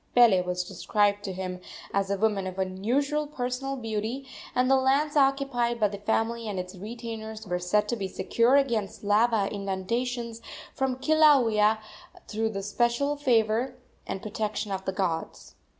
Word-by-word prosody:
Pele 230 -7 +6
was 180 0 -2
described 205 +2 +1
to 195 - -3
him 185 -1 -5 0.3
as 195 -1 +1
a 200 - 0
woman 205 -2 +1
of 185 0 -6
unusual 250 +11 0
personal 270 -1 -3
beauty, 225 +2 -3 0.3
and 250 0 +3
the 270 - +5
lands 275 +3 +2
occupied 270 -4 +2
by 210 - +4
the 200 0 -7
family 225 +2 -1
and 200 -3 -3
its 180 0 -6
retainers 220 +1 -7
were 180 -2 -2
said 210 +4 +1
to 240 - 0
be 200 -4 -3
secure 235 +6 +2
against 235 -9 0
lava 210 0 +3
inundations 230 +4 -3 0.3
from 265 -1 0
Kilauea 260 -8 +4 0.5
through 220 +1 -1
the 210 - -5
especial 240 +7 +1
favor 245 -2 +1 0.3
and 190 0 -4
protection 215 -1 -3
of 190 0 -3
the - - 0
gods. 180 -4 -3
220 Hz, 155 wpm, -27 LUFS, 200-250 Hz, 0.5 s, Pele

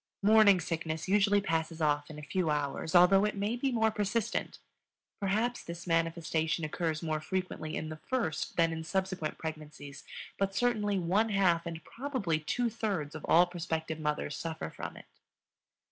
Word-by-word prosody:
"Morning 210 -2 +7
sickness" 160 0 -3
usually 205 +1 +4
passes 165 -3 -1
off 145 -1 +1
in 155 - -9
a 150 - -8
few 170 +2 -1
hours, 150 +2 -1
although 185 +3 +7
it 210 0 0
may 205 +3 -1
be 265 +2 0
more 220 -2 +2
persistent. 215 +2 -1 0.6
Perhaps 215 +5 0
this 170 0 -7
manifestation 165 -1 0
occurs 160 0 -2
more 155 -2 -1
frequently 180 -3 -3
in 155 - -4
the 155 - -6
first 235 -12 -1
than 165 -1 +3
in 160 0 -4
subsequent 185 -2 -2
pregnancies, 150 -3 -7 0.4
but 195 0 0
certainly 210 -3 +1
one 190 +6 +2
half, 180 -4 +2
and 165 -1 -6
probably 235 - -2
two 240 +10 -1
thirds, 205 -10 -2
of 155 - -8
all 175 +2 +6
prospective 160 -2 -3
mothers 150 -1 -2
suffer 160 +1 -5
from - - -7
it. - - -12
170 Hz, 160 wpm, -31 LUFS, 160-205 Hz, 0.6 s, Morning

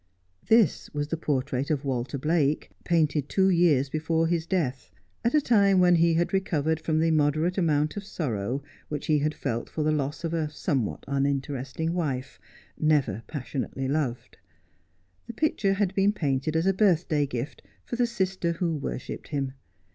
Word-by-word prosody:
This 225 -2 +3
was 145 0 -2
the 165 - 0
portrait 140 -3 -1
of 145 -2 -1
"Walter 130 +1 -2
Blake, 150 0 +1
painted 155 -4 +1
two 190 -1 +3
years 165 -6 +4
before 160 +3 0
his 165 0 0
death, 135 -10 -1 0.3
at 235 +5 +2
a 300 - +5
time 200 -7 +4
when 180 -1 +5
he 165 0 +4
had 170 +3 0
recovered 160 -5 0
from 160 0 -1
the 165 0 +3
moderate 155 +3 +2
amount 155 -4 +1
of 205 - -4
sorrow 130 - -3 0.3
which 150 -1 -4
he 150 -1 +3
had 150 +1 -1
felt 115 +1 -3
for 155 - -2
the 155 - +2
loss 145 +1 -2
of 165 0 -2
a 160 -2 0
somewhat 130 - -2
uninteresting 140 +2 -1
wife, 140 -7 -3 0.4
never 140 -9 +2
passionately 135 -2 -4
loved. 135 -4 -2 0.9
The - - -6
picture 215 -10 +1
had 195 -2 0
been 195 +1 +3
painted 145 -4 -1
as 160 +2 +2
a 195 - +4
birthday 170 -7 +2
gift 130 +2 -5 0.2
for - - -4
the 240 0 +2
sister 190 -6 -1
who 165 -1 -1
worshipped 140 - -5
him. 140 -3 -2
155 Hz, 170 wpm, -27 LUFS, 140-175 Hz, 0.9 s, a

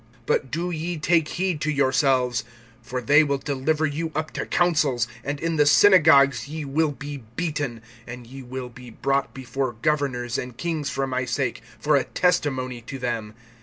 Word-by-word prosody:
(9)But 130 - 0
do 170 +5 -2
ye 170 +1 -3
take 160 0 +2
heed 180 -3 -2
to 155 - 0
yourselves; 130 -4 +2 0.4
for 125 +2 -4
they 145 +6 +6
will 140 -2 0
deliver 145 +3 0
you 155 +2 -2
up 155 0 -2
to - - -4
councils, 150 -9 +2 0.2
and 140 +1 -3
in 165 0 -1
the 150 - +5
synagogues 145 - +6
ye 155 0 -5
will 150 +2 +1
be 145 0 -7 0.2
beaten; 145 -8 -3 0.2
and 120 0 -8
ye 135 +3 -10
will 125 0 -6
be 125 0 -12
brought 135 +4 -1
before 130 0 -3
governors 135 -5 0
and 125 -2 -7
kings 160 -4 -2
for 135 0 -1
my 130 -1 -1
sake 125 -1 -2 0.2
for 150 0 +2
a 135 - +3
testimony 130 -8 0
to 130 +3 -7
them. 115 -4 -3
140 Hz, 175 wpm, -24 LUFS, 125-155 Hz, 0.4 s, they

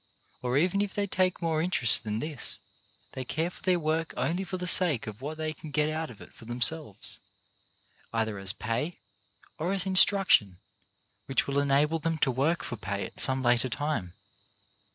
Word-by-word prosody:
Or 125 +1 -1
even 185 +6 +1
if 205 -1 -3
they 205 - 0
take 185 -2 -1
more 160 -2 0
interest 145 -11 +4
than 105 -1 -3
this, 150 +1 -4 0.6
they 130 - -5
care 160 +7 -3
for - - -16
their 185 -2 +2
work 160 +1 -2
only 175 +4 -1
for 185 0 -5
the 180 - -5
sake 175 -8 +5
of 110 +2 -9
what 150 +3 -6
they 155 0 -3
can 155 +1 -11
get 150 +1 0
out 160 +1 -4
of 115 - -13
it - - -14
for 115 - -15
themselves, 120 0 +1 0.9
either 110 -3 -2
as 95 -1 +1
pay, 115 - -4 0.6
or 170 +4 -2
as 195 -2 +1
instruction 190 - +5 0.7
which 135 - +1
will 140 0 -1
enable 145 +3 +1
them 165 +1 -2
to 140 -3 +1
work 145 +7 0
for 120 - -5
pay 100 0 -4
at - - -12
some 130 -1 +4
later 120 +1 +2
time. 120 - -3
150 Hz, 185 wpm, -28 LUFS, 120-165 Hz, 0.9 s, sake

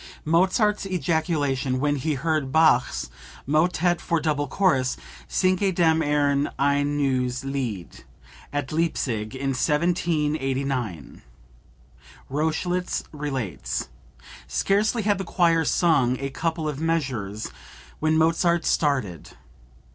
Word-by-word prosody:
(Mozart's 190 +5 +2
ejaculation 155 -7 0
when 145 +1 +1
he 150 +2 -1
heard 155 -1 -1
Bach's 150 - +3 0.3
motet 175 +3 +2
for 170 - 0
double 150 -2 -1
chorus, 135 -6 +1 0.3
"Singet 185 0 +1
dem 160 -2 +3
Herrn 145 -1 +1
ein 145 +1 +1
neues 130 -2 0
Lied," 125 -10 -4 0.5
at 145 -2 -3
Leipsic 130 -9 -1
in 135 +1 -2
1789. 140 - -1 1.1
Rochlitz 160 +5 -1
relates: 135 - -4 0.6
"Scarcely 215 +3 +1
had 205 -1 +1
the - - -2
choir 170 -2 +2
sung 145 -8 +2
a 135 0 -4
couple 160 +2 -2
of 150 -1 -4
measures 130 -11 -2 0.5
when 155 0 +2
Mozart 165 +1 +2
started. 130 - -1
150 Hz, 100 wpm, -24 LUFS, 135-170 Hz, 1.1 s, Bach's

